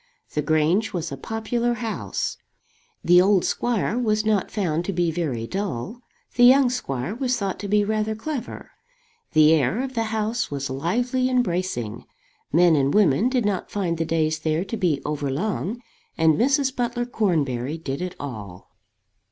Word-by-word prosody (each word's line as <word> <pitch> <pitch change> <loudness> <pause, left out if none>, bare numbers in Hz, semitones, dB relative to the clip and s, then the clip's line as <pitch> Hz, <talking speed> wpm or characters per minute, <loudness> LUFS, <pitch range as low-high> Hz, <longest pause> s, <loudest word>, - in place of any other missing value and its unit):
The 150 - 0
Grange 155 +9 +1
was 170 -3 -3
a - - -3
popular 230 - -2
house. 225 -2 -3 0.7
The 175 +1 +6
old 190 -1 +3
squire 240 0 0
was 215 -3 +1
not 215 -3 +1
found 170 -6 -1
to 195 - -2
be 175 -1 +1
very 145 -9 -2
dull. 195 - -4 0.3
The 245 - +3
young 255 0 +7
squire 135 - -3
was 255 +1 -1
thought 195 -4 -3
to 205 - -5
be 210 +1 +3
rather 215 +1 -1
clever. 250 +1 -6 0.6
The 155 0 +6
air 160 - +1
of 265 -1 -5
the 225 -2 0
house 220 +1 -1
was 140 -2 -4
lively 245 - 0
and 250 -1 +3
bracing. 170 - -3 0.5
Men 170 +1 +5
and 140 -1 +2
women 200 - +3
did 255 -4 0
not 200 -3 -1
find 175 -5 -2
the - - +2
days 160 -1 0
there 155 +3 -1
to 230 - -4
be 175 -9 +1
over 145 -1 -2
long. 205 - -2 0.4
And 160 -1 +4
Mrs. 270 - +2
Butler 240 -1 -1
Cornbury 155 - -1
did 140 -2 -5
it 180 0 -4
all. 105 -10 -8
190 Hz, 170 wpm, -23 LUFS, 155-230 Hz, 0.7 s, young